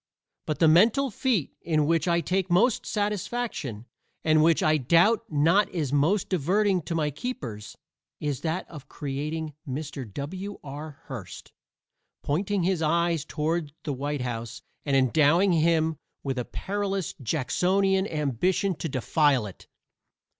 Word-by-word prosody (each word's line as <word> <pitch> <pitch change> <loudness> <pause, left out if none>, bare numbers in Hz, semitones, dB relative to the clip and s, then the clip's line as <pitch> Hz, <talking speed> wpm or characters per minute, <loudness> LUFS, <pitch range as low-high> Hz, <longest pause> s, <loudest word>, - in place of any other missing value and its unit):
But 155 - -1
the 165 - +4
mental 230 - +4
feat 240 - 0
in 155 -3 +1
which 165 +1 +1
I 170 0 +3
take 185 +3 -1
most 210 +7 +3
satisfaction, 205 - -2 0.4
and 155 -1 +4
which 165 +1 +4
I 155 0 +4
doubt 175 - +3
not 165 +8 +3
is 150 -6 -2
most 165 +8 +2
diverting 190 +3 +1
to 165 - -3
my 150 -2 0
keepers, 130 - -6 0.4
is 145 -3 -2
that 165 +2 -2
of 150 -5 -11
creating 150 +2 -4 0.2
Mr. 135 -4 -5
W.R. 150 - -7
Hearst, 115 -10 -8 0.7
pointing 190 +6 0
his 180 -2 +1
eyes 165 0 +1
toward 155 -1 -2
the 145 - -2
White 145 +1 -3
House 120 -2 -5 0.2
and 140 - +2
endowing 155 +8 +4
him 160 -1 +2 0.3
with 135 -2 -2
a 120 - -3
perilous 195 -2 -3
Jacksonian 190 - +1
ambition 160 - 0
to 165 - -4
defile 135 -1 +2
it. 100 - -11
160 Hz, 135 wpm, -26 LUFS, 145-190 Hz, 0.7 s, the